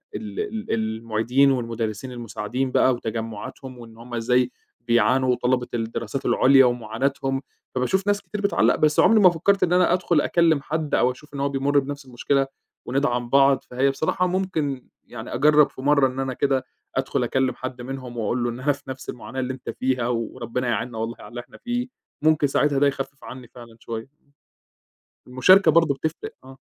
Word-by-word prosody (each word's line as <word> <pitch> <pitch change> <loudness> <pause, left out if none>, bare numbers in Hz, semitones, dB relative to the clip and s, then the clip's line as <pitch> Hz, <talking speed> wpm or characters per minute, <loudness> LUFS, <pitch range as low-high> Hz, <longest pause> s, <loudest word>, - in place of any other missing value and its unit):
ال 105 -2 -6
ال 215 +1 -4
المعيدين 115 +4 +1
والمدرسين 115 -1 -3
المساعدين 120 +2 -4
بقى 130 - +4
وتجمعاتهم، 115 +2 -6
وإن 115 -1 -13
هُم 120 +1 -12
إزاي 125 +2 +1 0.3
بيعانوا، 120 +2 +2
وطلبة 125 0 0
الدراسات 115 +2 -3
العليا 135 0 +5
ومعاناتهم، 125 +3 -1 0.3
فباشوف 190 +11 0
ناس 205 0 +2
كتير 210 - -6
بتعلّق، 125 - +3
بس 150 -1 +2
عمري 220 +3 +6
ما 190 -3 +8
فكّرت 195 +4 +1
إن 175 - +2
أنا 180 -1 +4
أدخل 175 -4 +2
أكلم 165 -4 +2
حدّ 155 0 -2
أو 125 - +3
أشوف 145 +3 -15
إن 140 - -5
هو 140 0 0
بيمُرّ 140 +1 +2
بنفس 140 0 -6
المشكلة، 135 +2 0 0.4
وندعم 125 -2 -1
بعض، 135 +1 +4
فهي 130 +2 +1
بصراحة 160 +6 0
ممكن 165 -8 -2 0.2
يعني - - -8
أجَرّب 150 +3 +5
في - - -11
مرة 140 0 +4
إن 130 +1 -6
أنا 135 -1 -2
كده، 135 -1 0 0.3
أدخل 135 -1 0
أكلم 130 +2 0
حد 130 -1 -6
منهم 125 -1 -7
وأقول 120 +2 -1
له 120 - 0
إن 120 +2 -6
أنا 145 +3 +2
في - - -15
نفس 130 0 -7
المعاناة 130 +2 -6
اللي 130 0 -2
أنت 130 - -9
فيها 130 -2 -1
وربنا 120 +1 -3
يعينّا 120 +1 -2
والله 115 +1 -3
على - - -11
اللي 120 0 -6
إحنا - - -17
فيه. 245 0 -3 0.3
ممكن 155 -2 +3
ساعتها 140 0 +1
ده 145 - +4
يخفف 135 0 -4
عني 125 -1 -9
فعلًا 120 -2 -14
شوية. 115 +1 -6 1.2
المشاركة 160 +11 +5
برضه 165 -4 +4
بتفرِق. 160 +3 -4
آه. 130 0 -13
130 Hz, 175 wpm, -23 LUFS, 120-145 Hz, 1.2 s, ما